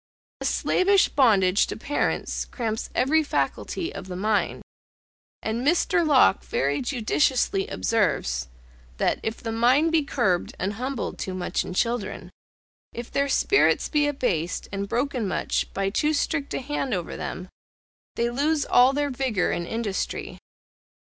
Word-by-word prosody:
A -, -, -5 dB
slavish 390 Hz, +1 st, +3 dB
bondage 205 Hz, -8 st, +4 dB
to -, -, -5 dB
parents 290 Hz, +6 st, -1 dB
cramps 225 Hz, -3 st, -4 dB
every 310 Hz, +5 st, +3 dB
faculty 335 Hz, +3 st, -2 dB
of 190 Hz, -, -8 dB
the 180 Hz, -, -6 dB
mind; 210 Hz, +3 st, 0 dB, 0.8 s
and 225 Hz, +2 st, -2 dB
Mr. 345 Hz, +4 st, +2 dB
Locke 280 Hz, -10 st, +4 dB
very 140 Hz, +1 st, -1 dB
judiciously 270 Hz, -, +1 dB
observes, 140 Hz, -, 0 dB, 0.5 s
that -, -, +1 dB
"if 220 Hz, 0 st, -3 dB
the 225 Hz, -, -5 dB
mind 255 Hz, +8 st, +3 dB
be 325 Hz, -1 st, +3 dB
curbed 240 Hz, -11 st, 0 dB
and 195 Hz, +2 st, -2 dB
humbled 255 Hz, +3 st, -4 dB
too 185 Hz, -, -4 dB
much 180 Hz, -1 st, -1 dB
in 180 Hz, -, -7 dB
children; 230 Hz, 0 st, -2 dB, 0.6 s
if 240 Hz, 0 st, -7 dB
their 280 Hz, 0 st, 0 dB
spirits 410 Hz, +8 st, +3 dB
be 295 Hz, -2 st, +2 dB
abased 190 Hz, -, -1 dB
and 200 Hz, 0 st, -4 dB
broken 245 Hz, -3 st, -1 dB
much -, -, -1 dB
by 195 Hz, 0 st, -1 dB
too 300 Hz, +8 st, +1 dB
strict 285 Hz, 0 st, -1 dB
an -, -, -3 dB
hand 275 Hz, -4 st, -2 dB
over 175 Hz, -2 st, -4 dB
them; 185 Hz, -, -5 dB, 0.7 s
they 235 Hz, 0 st, 0 dB
lose 290 Hz, +4 st, +1 dB
all 250 Hz, +2 st, +5 dB
their 290 Hz, 0 st, 0 dB
vigour 250 Hz, -8 st, 0 dB
and 170 Hz, 0 st, -3 dB
industry." 225 Hz, -4 st, -3 dB
240 Hz, 145 wpm, -25 LUFS, 200-285 Hz, 0.8 s, all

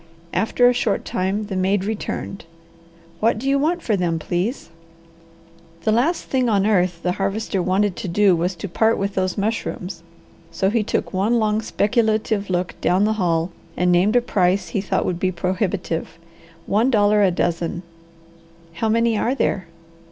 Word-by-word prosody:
After 245 Hz, +2 st, +3 dB
a 245 Hz, -, +4 dB
short 235 Hz, -4 st, -1 dB
time 195 Hz, +3 st, -1 dB
the 200 Hz, -2 st, -5 dB
maid 190 Hz, +1 st, +1 dB
returned. 205 Hz, -3 st, -4 dB, 0.7 s
"What 225 Hz, +1 st, +2 dB
do 255 Hz, +5 st, -4 dB
you 275 Hz, 0 st, +3 dB
want 335 Hz, +4 st, 0 dB
for 215 Hz, -, +1 dB
them, 175 Hz, -3 st, 0 dB
please?" 175 Hz, -, -3 dB, 1.1 s
The 215 Hz, -, +2 dB
last 270 Hz, +10 st, +1 dB
thing 255 Hz, -2 st, 0 dB
on 200 Hz, -2 st, +2 dB
earth 180 Hz, -5 st, +1 dB
the 180 Hz, -, +1 dB
Harvester 195 Hz, +1 st, -1 dB
wanted 190 Hz, +1 st, +1 dB
to -, -, -4 dB
do 190 Hz, +1 st, +4 dB
was 175 Hz, +3 st, -1 dB
to 175 Hz, +4 st, -6 dB
part 220 Hz, +5 st, +2 dB
with 200 Hz, 0 st, -2 dB
those 185 Hz, 0 st, -1 dB
mushrooms, 200 Hz, -4 st, -3 dB, 0.5 s
so 195 Hz, 0 st, 0 dB
he 230 Hz, 0 st, +2 dB
took 205 Hz, -, -2 dB
one 205 Hz, +6 st, +2 dB
long, 215 Hz, -1 st, +1 dB
speculative 220 Hz, -2 st, 0 dB
look 180 Hz, 0 st, -1 dB
down 185 Hz, +3 st, +2 dB
the 215 Hz, +1 st, +2 dB
hall 165 Hz, 0 st, +1 dB, 0.3 s
and 180 Hz, 0 st, +2 dB
named 185 Hz, +6 st, +3 dB
a 245 Hz, -, +5 dB
price 190 Hz, -4 st, +1 dB
he 200 Hz, -, -1 dB
thought 195 Hz, -, -1 dB
would 175 Hz, -1 st, -2 dB
be 185 Hz, 0 st, +1 dB
prohibitive. 180 Hz, -2 st, -2 dB, 0.5 s
"One 225 Hz, +6 st, +2 dB
dollar 210 Hz, -3 st, +3 dB
a 195 Hz, -, +5 dB
dozen." 175 Hz, 0 st, -1 dB, 0.9 s
"How 220 Hz, +7 st, -1 dB
many 230 Hz, +1 st, +2 dB
are 250 Hz, +3 st, 0 dB
there?" 190 Hz, -9 st, -1 dB
200 Hz, 170 wpm, -21 LUFS, 180-220 Hz, 1.1 s, a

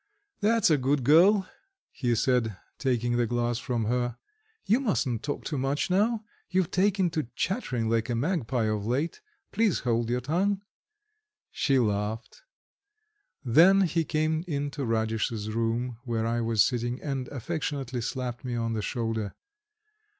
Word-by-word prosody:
"That's 220 Hz, -3 st, +3 dB
a 150 Hz, -, +4 dB
good 135 Hz, +1 st, +1 dB
girl," 185 Hz, -, +5 dB, 0.4 s
he 120 Hz, -3 st, 0 dB
said, 115 Hz, -4 st, +1 dB, 0.2 s
taking 120 Hz, -3 st, 0 dB
the 120 Hz, -1 st, +2 dB
glass 120 Hz, 0 st, 0 dB
from 120 Hz, -4 st, -2 dB
her. 120 Hz, +1 st, -1 dB, 0.5 s
"You 225 Hz, +5 st, +3 dB
mustn't 135 Hz, -, 0 dB
talk 145 Hz, -, -4 dB
too 150 Hz, -4 st, -2 dB
much 140 Hz, +6 st, -1 dB
now; 215 Hz, +4 st, +2 dB, 0.3 s
you've 185 Hz, -1 st, +1 dB
taken 190 Hz, -2 st, +2 dB
to 155 Hz, -6 st, -2 dB
chattering 135 Hz, -, -1 dB
like 115 Hz, +1 st, 0 dB
a 120 Hz, -, 0 dB
magpie 130 Hz, -4 st, 0 dB
of 110 Hz, -1 st, -1 dB
late. 140 Hz, -, -1 dB, 0.3 s
Please 220 Hz, -6 st, +1 dB
hold 120 Hz, -1 st, 0 dB
your 125 Hz, +1 st, +1 dB
tongue." 190 Hz, +9 st, 0 dB, 0.9 s
She 135 Hz, -2 st, +1 dB
laughed. 110 Hz, -, -1 dB, 1.0 s
Then 175 Hz, +11 st, +6 dB
he 170 Hz, -2 st, +1 dB
came 155 Hz, +1 st, 0 dB
into 145 Hz, -3 st, -2 dB
Radish's 110 Hz, -1 st, -1 dB
room 115 Hz, +1 st, -1 dB
where 115 Hz, -3 st, -1 dB
I 120 Hz, +1 st, 0 dB
was 115 Hz, -2 st, +3 dB
sitting 120 Hz, 0 st, -2 dB
and 135 Hz, -4 st, -3 dB
affectionately 140 Hz, -2 st, -3 dB
slapped 125 Hz, 0 st, -4 dB
me 125 Hz, -2 st, -3 dB
on 115 Hz, -1 st, -1 dB
the 110 Hz, -, -1 dB
shoulder. 110 Hz, -1 st, -2 dB
125 Hz, 145 wpm, -28 LUFS, 115-160 Hz, 1.0 s, Then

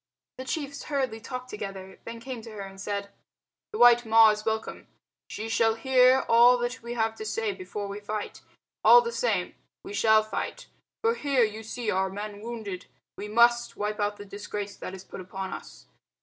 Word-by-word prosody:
The 260 Hz, -, -5 dB
chiefs 280 Hz, 0 st, -4 dB
hurriedly 260 Hz, -6 st, -2 dB
talked 255 Hz, +2 st, -7 dB
together, 195 Hz, -2 st, -7 dB
then 230 Hz, -, -6 dB
they 230 Hz, -, -11 dB
came 250 Hz, -1 st, -6 dB
to 225 Hz, -, -11 dB
her 215 Hz, -2 st, -8 dB
and 195 Hz, 0 st, -9 dB
said 200 Hz, 0 st, -4 dB, 0.6 s
"The 430 Hz, -, -4 dB
white 240 Hz, 0 st, +7 dB
Ma 225 Hz, -1 st, +7 dB
is 210 Hz, 0 st, -4 dB
welcome. 220 Hz, 0 st, -3 dB, 0.4 s
She 220 Hz, -, -5 dB
shall 225 Hz, 0 st, +2 dB
hear 255 Hz, +2 st, +5 dB
all 240 Hz, +2 st, +7 dB
that 240 Hz, 0 st, -3 dB
we 235 Hz, +1 st, -6 dB
have 225 Hz, -1 st, +1 dB
to -, -, -6 dB
say 215 Hz, 0 st, -1 dB
before 195 Hz, +2 st, -6 dB
we 200 Hz, +1 st, -6 dB
fight. 210 Hz, 0 st, -5 dB, 0.4 s
All 485 Hz, -, +9 dB
the 470 Hz, -1 st, -3 dB
same -, -, 0 dB, 0.3 s
we 390 Hz, -, -8 dB
shall 220 Hz, -, +4 dB
fight. 215 Hz, -, -5 dB, 0.4 s
For 455 Hz, 0 st, +3 dB
here 280 Hz, -, +2 dB
you 215 Hz, 0 st, -2 dB
see 225 Hz, +1 st, -3 dB
are 190 Hz, +1 st, +1 dB
men 205 Hz, +1 st, -7 dB
wounded. 220 Hz, -5 st, -6 dB, 0.3 s
We 205 Hz, -, -6 dB
must 235 Hz, +2 st, +3 dB
wipe 210 Hz, +1 st, -2 dB
out 205 Hz, 0 st, -1 dB
the 205 Hz, -, -9 dB
disgrace 200 Hz, 0 st, -6 dB
that 185 Hz, -, -7 dB
is 190 Hz, -, -10 dB
put -, -, -9 dB
upon 190 Hz, +1 st, -6 dB
us. -, -, -10 dB
220 Hz, 195 wpm, -27 LUFS, 205-240 Hz, 0.6 s, All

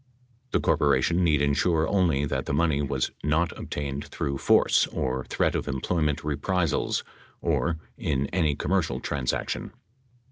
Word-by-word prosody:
The -, -, +1 dB
corporation 75 Hz, +3 st, +2 dB
need 75 Hz, -4 st, +3 dB
insure 80 Hz, +3 st, +2 dB
only 85 Hz, -8 st, +2 dB
that 65 Hz, -2 st, -2 dB
the 70 Hz, -, 0 dB
money 75 Hz, -2 st, +2 dB
was 70 Hz, -2 st, -1 dB
not 80 Hz, +4 st, +1 dB
obtained 70 Hz, -1 st, -4 dB
through 70 Hz, -1 st, -3 dB
force -, -, +4 dB
or 65 Hz, 0 st, -2 dB
threat -, -, 0 dB
of -, -, -2 dB
employment 75 Hz, +2 st, -1 dB
reprisals, 80 Hz, +3 st, 0 dB, 0.4 s
or 85 Hz, -1 st, 0 dB, 0.2 s
"in 70 Hz, -2 st, 0 dB
any 80 Hz, -5 st, +2 dB
commercial 90 Hz, +1 st, 0 dB
trans 70 Hz, -4 st, -1 dB
action." -, -, -4 dB
75 Hz, 140 wpm, -26 LUFS, 70-85 Hz, 0.4 s, force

